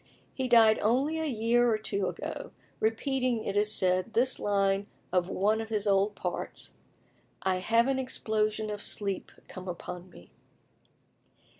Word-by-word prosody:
He 260 Hz, -1 st, -2 dB
died 225 Hz, -3 st, +6 dB
only 270 Hz, +9 st, +1 dB
a 320 Hz, -, -1 dB
year 240 Hz, -1 st, +2 dB
or 215 Hz, -, +2 dB
two 200 Hz, -3 st, -1 dB
ago, -, -, -5 dB, 0.3 s
repeating, 245 Hz, +1 st, 0 dB
it 200 Hz, -, -3 dB
is 210 Hz, +1 st, +4 dB
said, 185 Hz, +1 st, +1 dB
this 255 Hz, +3 st, +2 dB
line 200 Hz, -1 st, +1 dB, 0.2 s
of 180 Hz, 0 st, +1 dB
one 215 Hz, +3 st, +1 dB
of 225 Hz, -, -7 dB
his 210 Hz, -2 st, -1 dB
old 200 Hz, +1 st, +2 dB
parts: -, -, -4 dB, 0.7 s
"I 190 Hz, -1 st, +2 dB
have 230 Hz, +6 st, +3 dB
an 270 Hz, -1 st, +1 dB
exposition 215 Hz, -4 st, -1 dB
of 205 Hz, -1 st, -5 dB
sleep 200 Hz, -2 st, -3 dB, 0.2 s
come 185 Hz, 0 st, -9 dB
upon 180 Hz, 0 st, -6 dB
me." 90 Hz, -, -16 dB
215 Hz, 150 wpm, -29 LUFS, 195-235 Hz, 0.7 s, died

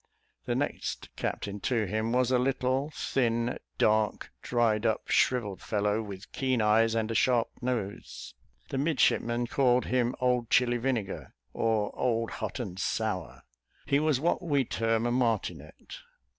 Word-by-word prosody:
The -, -, -1 dB
next -, -, -3 dB
captain 100 Hz, 0 st, -3 dB
to 115 Hz, +1 st, 0 dB
him 110 Hz, +4 st, -1 dB
was 125 Hz, 0 st, +2 dB
a 125 Hz, -, +4 dB
little, 130 Hz, +2 st, 0 dB
thin, 120 Hz, -5 st, -1 dB, 0.2 s
dark, 110 Hz, -1 st, +1 dB
dried 115 Hz, -3 st, +1 dB
up, 110 Hz, -2 st, 0 dB
shrivelled 105 Hz, -7 st, +1 dB
fellow, 105 Hz, 0 st, 0 dB
with 100 Hz, -2 st, -9 dB
keen 130 Hz, -2 st, 0 dB
eyes, 110 Hz, +1 st, +3 dB
and 110 Hz, 0 st, 0 dB
a -, -, -1 dB
sharp 120 Hz, 0 st, +2 dB
nose. 115 Hz, -6 st, -4 dB, 0.4 s
The 135 Hz, -, -2 dB
midshipmen 120 Hz, -5 st, +2 dB
called 125 Hz, 0 st, +2 dB
him 125 Hz, -1 st, +1 dB
"Old 125 Hz, -2 st, +1 dB
Chili 120 Hz, 0 st, +3 dB
Vinegar," 120 Hz, -5 st, -3 dB, 0.2 s
or, 110 Hz, -2 st, 0 dB
"Old 115 Hz, -2 st, 0 dB
Hot -, -, -3 dB
and 95 Hz, -6 st, -5 dB
Sour." 95 Hz, -, -2 dB, 0.4 s
He 140 Hz, 0 st, +2 dB
was 155 Hz, -3 st, +2 dB
what 170 Hz, +5 st, +1 dB
we 145 Hz, -6 st, +1 dB
term 115 Hz, 0 st, 0 dB
a 120 Hz, -, +1 dB
martinet. 110 Hz, -, -2 dB
115 Hz, 145 wpm, -29 LUFS, 110-125 Hz, 0.4 s, a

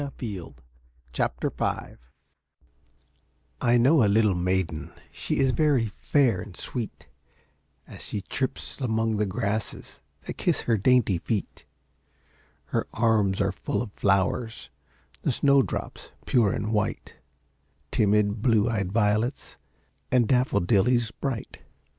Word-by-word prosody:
A 140 Hz, -1 st, -4 dB
Child 95 Hz, -, -6 dB, 0.6 s
of -, -, +2 dB
Spring -, -, -2 dB, 1.6 s
I 120 Hz, 0 st, +4 dB
know 135 Hz, +3 st, +5 dB
a -, -, +4 dB
little 105 Hz, -1 st, +4 dB
maiden, 90 Hz, -3 st, -1 dB, 0.2 s
She -, -, -3 dB
is 135 Hz, -1 st, +3 dB
very 135 Hz, -7 st, +2 dB
fair 125 Hz, -11 st, +2 dB
and 100 Hz, -2 st, -10 dB
sweet, 115 Hz, -4 st, -5 dB, 0.8 s
As -, -, -11 dB
she 105 Hz, -, -4 dB
trips 135 Hz, +3 st, -4 dB
among 110 Hz, -3 st, 0 dB
the 105 Hz, 0 st, +1 dB
grasses 105 Hz, +1 st, -3 dB, 0.2 s
That -, -, -7 dB
kiss -, -, +1 dB
her 115 Hz, -, +1 dB
dainty 110 Hz, -5 st, +3 dB
feet; 105 Hz, +1 st, -4 dB, 1.0 s
Her -, -, -2 dB
arms 110 Hz, -4 st, +2 dB
are -, -, +1 dB
full 105 Hz, -, -2 dB
of 105 Hz, -4 st, -10 dB
flowers, 100 Hz, +4 st, 0 dB, 0.5 s
The -, -, +1 dB
snow 140 Hz, +2 st, +4 dB
drops, -, -, -5 dB, 0.2 s
pure 115 Hz, -6 st, +3 dB
and 110 Hz, +2 st, -2 dB
white, 105 Hz, -, -2 dB, 0.7 s
Timid 105 Hz, 0 st, +2 dB
blue 110 Hz, -3 st, +3 dB
eyed 100 Hz, -5 st, -1 dB
violets, 110 Hz, +4 st, 0 dB, 0.5 s
And 125 Hz, -3 st, +3 dB
daffodillies 120 Hz, -1 st, +2 dB
bright. 130 Hz, -3 st, -5 dB
110 Hz, 125 wpm, -26 LUFS, 100-125 Hz, 1.6 s, know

